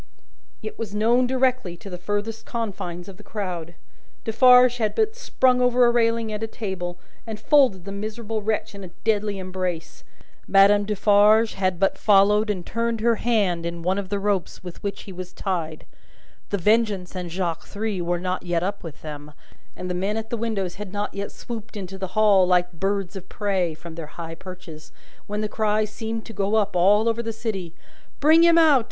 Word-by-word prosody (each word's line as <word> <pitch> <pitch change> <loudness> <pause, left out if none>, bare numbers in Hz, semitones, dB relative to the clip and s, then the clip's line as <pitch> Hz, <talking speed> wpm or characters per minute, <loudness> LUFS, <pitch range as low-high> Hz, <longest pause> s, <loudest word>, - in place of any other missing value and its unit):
It 215 - -7
was 210 -3 -5
known 235 +4 +3
directly, 255 -8 0
to 185 - -12
the 180 -2 -6
furthest 210 +4 -3
confines 180 -6 -5
of 195 -2 -10
the - - -13
crowd. 180 -6 -5 0.5
Defarge 250 +2 +6
had 220 -3 -1
but 440 0 +1
sprung 260 - +2
over 250 0 +4
a 240 - +5
railing 230 -2 +1
and 210 - -4
a 225 - -1
table, 190 -5 -5 0.3
and 220 -2 -5
folded 245 - +3
the 200 - -6
miserable 215 +2 -4
wretch 215 0 -2
in 200 -1 -9
a - - -7 0.2
deadly 210 -2 +1
embrace 185 -3 -4 0.4
Madame 200 +1 +5
Defarge 210 +2 +4
had 185 -2 -1
but 195 - +1
followed 210 +1 +4
and 185 -4 -2
turned 230 0 -1
her 230 0 +3
hand 200 -8 +1
in 170 0 -5
one 185 +3 +1
of 195 -2 -6
the 205 - 0
ropes 200 -3 -2
with 180 -2 -9
which 200 -1 -4
he 195 - -9
was 180 0 -8
tied 165 -5 -3 0.6
The 200 - 0
Vengeance 205 -2 +1
and 180 -1 -4
Jacques 170 -2 -3
Three 205 -2 -3
were 175 0 -1
not 185 +1 -2
yet 175 -1 -1
up 200 +2 -3
with 165 -4 -10
them, 150 -1 -8 0.4
and 180 - -6
the 180 - -2
men 195 +4 -1
at 225 0 -5
the - - 0
windows 205 -6 -3
had 200 -3 -6
not 205 +1 -3
yet 200 0 -4
swooped 230 -2 -8
into 190 -1 -7
the 190 +1 -6
Hall, 200 -4 +5
like 180 0 +2
birds 195 +1 -2
of 190 -1 -9
prey 190 -6 -1
from 165 +1 -10
their 160 -2 -7
high 165 -1 -6
perches 175 -3 -11 0.4
when 210 +1 -3
the 215 - -1
cry 215 0 +1
seemed 220 +1 -5
to 225 - -9
go 200 +1 0
up, 205 -3 +1
all 205 +5 +4
over 230 0 +1
the 225 -1 -3
city, 215 -7 -5 0.4
"Bring 315 +3 +6
him 340 0 +6
out! 310 -5 +6
205 Hz, 195 wpm, -24 LUFS, 180-225 Hz, 0.6 s, Defarge